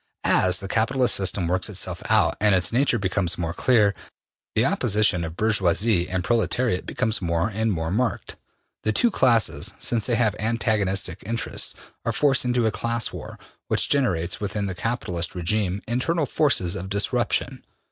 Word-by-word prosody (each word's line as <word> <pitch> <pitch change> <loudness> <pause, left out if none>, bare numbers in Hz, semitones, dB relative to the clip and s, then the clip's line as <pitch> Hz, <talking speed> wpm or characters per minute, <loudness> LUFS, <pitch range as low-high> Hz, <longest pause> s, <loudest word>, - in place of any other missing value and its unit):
As 90 0 +3
the 95 - -5
capitalist 125 +5 +1
system 95 -2 +1
works 90 +2 0
itself - - -2
out - - +3
and 105 -1 +4
its 95 +4 0
nature 130 0 +2
becomes 95 -3 -1
more 85 -1 -3
clear, 105 0 +3 0.6
the - - +3
opposition 105 -5 +2
of 85 +1 -6
bourgeoisie 100 -2 +1
and 90 0 -2
proletariat 115 -1 0
becomes 110 -4 0
more 85 +2 0
and 110 +1 -1
more 80 -3 -2
marked. 115 +5 -2 0.5
The 110 - 0
two 240 - +2
classes, 120 - +2
since 115 -3 0
they 120 - +1
have 115 -3 +1
antagonistic 100 -5 -1
interests, 115 +3 -2 0.3
are 115 - -1
forced 135 +1 +2
into 125 -1 +1
a 110 - +2
class 115 +2 -2
war - - -8 0.3
which - - +1
generates 90 - 0
within 100 0 -2
the 95 - -3
capitalist 90 -5 -3
regime 95 +2 -1
internal 145 +7 0
forces 120 - +1
of 95 0 -6
disruption. 100 +1 0
105 Hz, 160 wpm, -23 LUFS, 90-115 Hz, 0.6 s, and